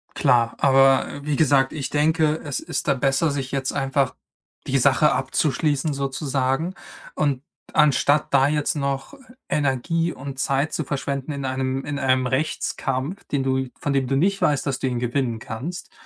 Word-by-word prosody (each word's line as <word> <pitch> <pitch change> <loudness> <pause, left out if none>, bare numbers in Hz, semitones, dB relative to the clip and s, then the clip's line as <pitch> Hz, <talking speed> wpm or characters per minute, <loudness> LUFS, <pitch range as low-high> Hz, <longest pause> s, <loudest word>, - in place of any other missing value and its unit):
Klar, 120 -5 +3
aber, 135 -1 +5
äh, 145 0 -8
wie 150 -1 0
gesagt, 135 -3 +3
ich 145 -4 -4
denke, 155 +1 +2
es 145 -3 -3
ist 160 -5 -4
da 140 - +4
besser, 135 +4 +1
sich 135 -2 -4
jetzt 135 -1 -1
einfach 135 -1 0 0.5
die - - +2
Sache - - +4
abzuschließen 145 +1 0
sozusagen 135 +3 -1 0.4
und 140 -3 0 0.3
anstatt 150 0 +3
da 135 0 +5
jetzt 150 0 0
noch 140 - -2 0.3
Energie 150 +4 0
und 135 0 -8
Zeit 140 +2 0
zu 160 - -1
verschwenden 140 0 -3
in 140 -1 -4
einem 130 0 -2
in 145 -1 -3
einem 130 -1 +2
Rechtskampf, 135 +3 -2
den 140 -2 -1
du 130 0 0
von 145 - -1
dem 135 -2 +1
du 135 - 0
nicht 195 +5 +1
weißt, 145 -2 +2
dass 135 -2 -1
du 130 - -1
ihn 125 -2 -1
gewinnen 120 -1 -1
kannst, 140 +12 -6
140 Hz, 170 wpm, -23 LUFS, 130-150 Hz, 0.5 s, aber